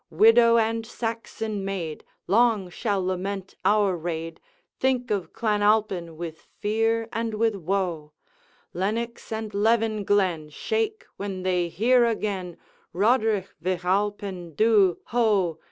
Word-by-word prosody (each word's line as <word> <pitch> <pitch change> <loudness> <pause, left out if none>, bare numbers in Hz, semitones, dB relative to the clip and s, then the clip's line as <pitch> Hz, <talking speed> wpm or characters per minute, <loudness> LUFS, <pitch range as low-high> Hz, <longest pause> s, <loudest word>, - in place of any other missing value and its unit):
Widow 230 +1 +6
and 225 0 +1
Saxon 225 -2 -4
maid 180 -6 -4 0.2
Long 215 -3 +2
shall 200 -2 -1
lament 190 +1 -3
our 205 -3 +3
raid, 165 -1 -5 0.4
Think 255 -2 0
of 200 -4 -1
Clan 210 -2 0
Alpine 200 -6 +1
with 165 -1 -6 0.2
fear 225 +2 0
and 225 0 -2
with 225 +1 +2
woe; 175 -4 -2 0.6
Lennox 225 +7 -3
and 220 -1 -4
Leven 220 0 +2
glen 185 -7 +1
Shake 440 - -2
when 195 -2 -5
they 180 -2 +1
hear 240 +8 +3
again, 200 -6 -2 0.4
'Roderigh 215 -1 +2
Vich 180 0 -2
Alpine 190 -3 -1
dhu, 205 -3 +4
ho! 210 -8 +1
205 Hz, 120 wpm, -25 LUFS, 185-225 Hz, 0.6 s, Widow